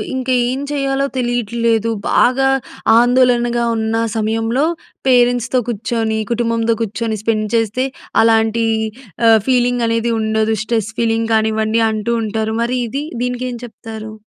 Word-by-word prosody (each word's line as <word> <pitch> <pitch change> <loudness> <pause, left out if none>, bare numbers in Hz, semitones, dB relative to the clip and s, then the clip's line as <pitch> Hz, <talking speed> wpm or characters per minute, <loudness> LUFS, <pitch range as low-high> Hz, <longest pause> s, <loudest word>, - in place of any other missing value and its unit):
ఇంక 260 0 -3 0.2
ఏం 260 +2 -2
చేయాలో 275 -1 0
తెలియట్లేదు. 235 -2 0 0.2
బాగా 270 +2 +3 0.5
ఆందోళనగా 240 -1 +3
ఉన్నా 220 +1 0 0.2
సమయంలో, 225 +5 0 0.4
పేరెంట్స్‌తో 245 0 +3
కుచ్చోని, 220 0 -1
కుటుంబంతో 230 -1 +1
కుచ్చోని 220 +1 -3
స్పెండ్ 215 -2 0
చేస్తే 225 +3 0 0.4
అలాంటి 225 0 +2 0.6
ఆహ్, 225 -1 +6
ఫీలింగనేది 240 -2 +1
ఉండదు. 220 0 0
స్ట్రెస్ 225 -2 -1
ఫీలింగ్ 225 0 0
కానివ్వండి 220 +1 +1
అంటూ 215 +2 -2
ఉంటారు. 220 +1 -2
మరి 250 +2 -1
ఇది? 275 +6 -4 0.2
దీనికేం 250 0 -3
చెప్తారు? 220 -2 -9
230 Hz, 115 wpm, -17 LUFS, 220-245 Hz, 0.6 s, ఆహ్